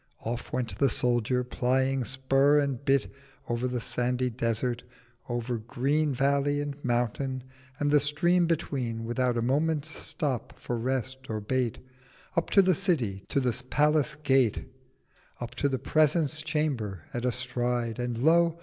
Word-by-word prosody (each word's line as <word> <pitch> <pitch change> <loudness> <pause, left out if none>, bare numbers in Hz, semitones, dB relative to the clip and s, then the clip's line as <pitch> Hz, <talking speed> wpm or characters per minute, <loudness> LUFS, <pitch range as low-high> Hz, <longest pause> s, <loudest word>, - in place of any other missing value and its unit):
'— - - -40
Off 120 +1 -5
went 120 -6 -2
the 140 - +4
Soldier, 125 +1 +1
plying 130 +1 +1
Spur 135 +3 +3
and 140 -3 0
Bit— 135 -1 +1 0.3
Over 120 +2 -1
the 125 -1 -2
sandy 125 +2 -1
Desert, 120 +1 -1 0.5
over 120 0 -2
green 140 +6 0
Valley, 140 +2 +2
and 145 -1 -3
Mountain, 125 +2 -1 0.3
and 145 0 +1
the 150 - +6
Stream 170 +5 +2
between, 130 -8 -2
Without 120 +1 0
a 115 - 0
Moment's 150 +4 +1
Stop 140 -5 -3
for 120 - -3
rest 130 +2 -3
or 110 -1 -2
bait, 120 +2 -1 0.6
Up 170 - +1
to 195 - +6
the 185 0 +4
City—to 140 - 0
the 125 -2 -1
Palace 150 0 +2
Gate— 135 -6 +2 0.7
Up 120 -1 -6
to 140 - 0
the 135 - 0
Presence 155 +2 +2
Chamber 140 - -2
at 120 - -3
a 125 - +2
Stride— 125 -1 -2
And 120 -1 -2
Lo! 165 +5 +4
130 Hz, 150 wpm, -28 LUFS, 120-145 Hz, 0.7 s, the